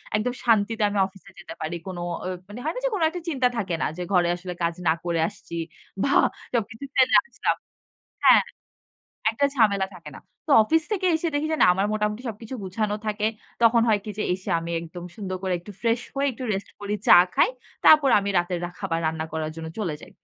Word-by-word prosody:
একদম 215 Hz, +4 st, 0 dB
শান্তিতে 220 Hz, -1 st, +2 dB
আমি 205 Hz, -, -3 dB
অফিসে 195 Hz, 0 st, -13 dB
যেতে -, -, -9 dB
পারি। 160 Hz, +2 st, -3 dB
কোন 185 Hz, -2 st, -5 dB
অ -, -, -3 dB, 0.4 s
মানে 210 Hz, +4 st, -8 dB
হয় 315 Hz, -, -1 dB
না -, -, -3 dB
যে -, -, +3 dB
কোন 400 Hz, -, -1 dB
একটা 350 Hz, +2 st, -6 dB
চিন্তা 265 Hz, -5 st, +2 dB
থাকে 185 Hz, -6 st, -1 dB
না। -, -, +2 dB
যে -, -, -4 dB
ঘরে 175 Hz, -2 st, +4 dB
আসলে 180 Hz, 0 st, -6 dB
কাজ 170 Hz, 0 st, 0 dB
না 160 Hz, -, +5 dB
করে 170 Hz, -1 st, 0 dB
আসছি। 170 Hz, -, -10 dB, 0.5 s
ভা 275 Hz, -, +1 dB, 0.4 s
সবকিছু 225 Hz, +2 st, -2 dB
ফেলে 260 Hz, -1 st, +5 dB
আসলাম -, -, -1 dB, 0.7 s
হ্যাঁ। -, -, +8 dB, 0.9 s
একটা 280 Hz, +5 st, +2 dB
ঝামেলা 200 Hz, -5 st, +3 dB
থাকে 165 Hz, -4 st, -11 dB
না। -, -, -11 dB, 0.3 s
তো -, -, -5 dB
অফিস 320 Hz, +9 st, +2 dB
থেকে 380 Hz, -3 st, 0 dB
এসে 335 Hz, +1 st, -2 dB
দেখি 290 Hz, +2 st, 0 dB
যে -, -, +1 dB
না -, -, +8 dB
আমার 195 Hz, +2 st, +1 dB
মোটামুটি 210 Hz, +2 st, -1 dB
সবকিছু 225 Hz, +3 st, -7 dB
গুছানো 205 Hz, +3 st, -1 dB
থাকে। 210 Hz, 0 st, 0 dB, 0.4 s
তখন 230 Hz, 0 st, +5 dB
হয় 215 Hz, -2 st, +4 dB
কি 215 Hz, -, -5 dB
যে -, -, 0 dB
এসে 185 Hz, +1 st, -6 dB
আমি 165 Hz, 0 st, -6 dB
একদম 170 Hz, +1 st, -9 dB
সুন্দর 190 Hz, -4 st, -4 dB
করে 190 Hz, -1 st, -1 dB
একটু 190 Hz, +5 st, -11 dB
ফ্রেশ 230 Hz, 0 st, +2 dB
হয়ে 280 Hz, +1 st, +1 dB
একটু 255 Hz, +2 st, -7 dB
রেস্ট 195 Hz, 0 st, -3 dB
করি 205 Hz, 0 st, -2 dB
চা -, -, +9 dB, 0.2 s
খাই। -, -, +4 dB, 0.4 s
তারপর 300 Hz, -3 st, +7 dB
আমি 200 Hz, 0 st, -2 dB
রাতের 175 Hz, 0 st, -1 dB
রাখা 175 Hz, 0 st, -8 dB
খাবার 165 Hz, -4 st, -1 dB
রান্না 160 Hz, 0 st, -1 dB
করার 160 Hz, -1 st, -2 dB
জন্য 160 Hz, 0 st, -6 dB
চলে 180 Hz, -8 st, -2 dB
যাই। -, -, -13 dB
210 Hz, 215 wpm, -25 LUFS, 180-235 Hz, 0.9 s, চা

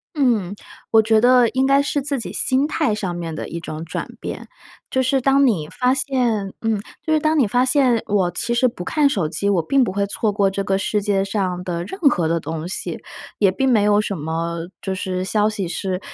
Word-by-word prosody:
嗯。 230 Hz, -, +1 dB, 0.4 s
我 220 Hz, -1 st, +6 dB
觉 220 Hz, 0 st, +3 dB
得 245 Hz, -1 st, +5 dB
应 260 Hz, +1 st, +1 dB
该 275 Hz, +1 st, +4 dB
是 285 Hz, +1 st, -1 dB
自 280 Hz, -2 st, -2 dB
己 -, -, -6 dB
心 265 Hz, +2 st, +1 dB
态 300 Hz, -7 st, 0 dB
上 190 Hz, -4 st, -3 dB
面 165 Hz, -2 st, -5 dB
的 -, -, -5 dB
一 170 Hz, -, -5 dB
种 155 Hz, 0 st, -6 dB
转 -, -, -4 dB
变， -, -, -6 dB, 0.5 s
就 260 Hz, -, +2 dB
是 265 Hz, +1 st, +1 dB
当 275 Hz, +2 st, +4 dB
你 165 Hz, -11 st, 0 dB
发 250 Hz, +8 st, +1 dB
现 245 Hz, -7 st, 0 dB
嗯， 225 Hz, -2 st, 0 dB, 0.2 s
就 315 Hz, -, 0 dB
是 310 Hz, -, +4 dB
当 310 Hz, +1 st, +1 dB
你 255 Hz, -, +4 dB
发 245 Hz, +4 st, +2 dB
现 255 Hz, -3 st, +3 dB
我 195 Hz, -4 st, +1 dB
其 235 Hz, +7 st, -2 dB
实 250 Hz, +2 st, +3 dB
不 180 Hz, -6 st, -7 dB
看 300 Hz, -3 st, +2 dB
手 185 Hz, -, -1 dB
机， 200 Hz, +5 st, -1 dB
我 185 Hz, -4 st, +2 dB
并 270 Hz, +10 st, +2 dB
不 230 Hz, -, 0 dB
会 200 Hz, +1 st, 0 dB
错 210 Hz, +1 st, -1 dB
过 200 Hz, -1 st, +2 dB
这 195 Hz, +1 st, -2 dB
个 195 Hz, -1 st, +1 dB
世 205 Hz, +1 st, -1 dB
界 195 Hz, -1 st, +1 dB
上 185 Hz, -3 st, -2 dB
的 170 Hz, -2 st, -3 dB
任 385 Hz, -, -8 dB
何 180 Hz, -, +3 dB
的 165 Hz, +1 st, +1 dB
东 160 Hz, +1 st, -5 dB
西， 190 Hz, -, -4 dB, 0.4 s
也 200 Hz, -3 st, +4 dB
并 265 Hz, +8 st, 0 dB
没 225 Hz, -5 st, +4 dB
有 205 Hz, 0 st, +4 dB
什 205 Hz, -2 st, -3 dB
么 165 Hz, +2 st, -3 dB, 0.2 s
就 190 Hz, -, -3 dB
是 185 Hz, 0 st, -3 dB
消 210 Hz, +2 st, +1 dB
息 205 Hz, -3 st, -3 dB
是， 185 Hz, +1 st, -3 dB
210 Hz, 245 characters per minute, -21 LUFS, 185-255 Hz, 0.5 s, 我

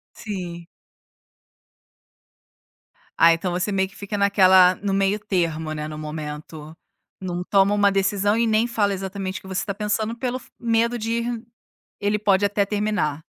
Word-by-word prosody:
Sim. 175 Hz, -5 st, -6 dB, 2.5 s
Ai, 165 Hz, 0 st, +7 dB
então 175 Hz, +2 st, -3 dB
você 185 Hz, +4 st, -1 dB
meio 190 Hz, -1 st, 0 dB
que 195 Hz, -, -20 dB
fica 205 Hz, 0 st, -5 dB
naquela, 190 Hz, -2 st, +6 dB
no 200 Hz, -1 st, -3 dB
meio 195 Hz, +2 st, +1 dB
termo, 165 Hz, -5 st, -1 dB
né, 150 Hz, 0 st, -4 dB
no 155 Hz, 0 st, -7 dB
momento, 155 Hz, +1 st, -7 dB, 0.4 s
não 180 Hz, -1 st, -4 dB
toma 195 Hz, +1 st, +3 dB
uma 205 Hz, -1 st, +3 dB
decisão 200 Hz, +2 st, +1 dB
e 235 Hz, -, +2 dB
nem 220 Hz, +1 st, +2 dB
fala 210 Hz, -4 st, 0 dB
exatamente 190 Hz, 0 st, -4 dB
o -, -, -19 dB
que -, -, -14 dB
você 190 Hz, 0 st, -2 dB
tá 200 Hz, -, -3 dB
pensando 215 Hz, +2 st, -2 dB
pelo 255 Hz, 0 st, -2 dB
f -, -, -19 dB
medo 235 Hz, +1 st, +1 dB
de 225 Hz, +1 st, -3 dB
ir, 235 Hz, -1 st, -4 dB, 0.5 s
ele 205 Hz, +1 st, 0 dB
pode 205 Hz, -1 st, +3 dB
até 200 Hz, 0 st, +1 dB
terminar. 205 Hz, -8 st, -1 dB
195 Hz, 160 wpm, -23 LUFS, 180-210 Hz, 2.5 s, Ai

